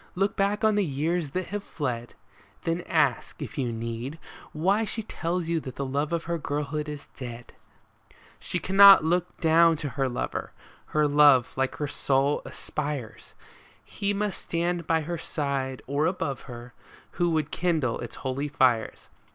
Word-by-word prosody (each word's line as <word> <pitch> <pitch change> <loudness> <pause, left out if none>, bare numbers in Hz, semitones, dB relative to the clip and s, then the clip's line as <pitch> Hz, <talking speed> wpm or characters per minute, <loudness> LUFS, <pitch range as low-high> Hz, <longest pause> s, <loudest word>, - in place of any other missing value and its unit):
Look 195 +2 +1
back 205 +2 0
on 220 0 +4
the 205 0 +2
years 160 +1 -1
that 185 +5 -3
have 205 0 -3
fled; 120 -9 -4 0.5
Then 165 +1 -1
ask, 145 -7 +1
if - - -6
you 125 -3 0
need, 115 +5 -5 0.3
why 190 +8 +2
she 225 +1 -4
tells 175 -4 -3
you 165 0 +1
that 130 -5 -8
the 140 - -3
love 145 +3 -1
of 170 -1 -1
her 170 0 -2
girlhood 150 +1 -3
is 150 -1 -7
dead! 120 -2 -8 0.9
She - - -3
cannot 195 +1 +8
look 175 +2 0
down 165 0 +5
to 145 -2 -4
her 135 +1 -1
lover; 125 - -4 0.3
her 150 -1 +2
love, 145 -4 +5
like 135 0 0
her 150 - -2
soul, 140 +1 +1
aspires; 140 -7 -5 0.5
He 200 -1 -2
must 205 -1 -2
stand 170 0 -2
by 165 -1 +2
her 170 +2 -4
side, 140 -5 -3
or 140 +3 +1
above 165 -7 -3
her, 120 +1 -9 0.4
who 175 0 +1
would 155 -3 0
kindle 160 -9 0
its 120 - -7
holy 135 +3 -1
fires. 130 -5 +1
150 Hz, 165 wpm, -27 LUFS, 135-175 Hz, 0.9 s, cannot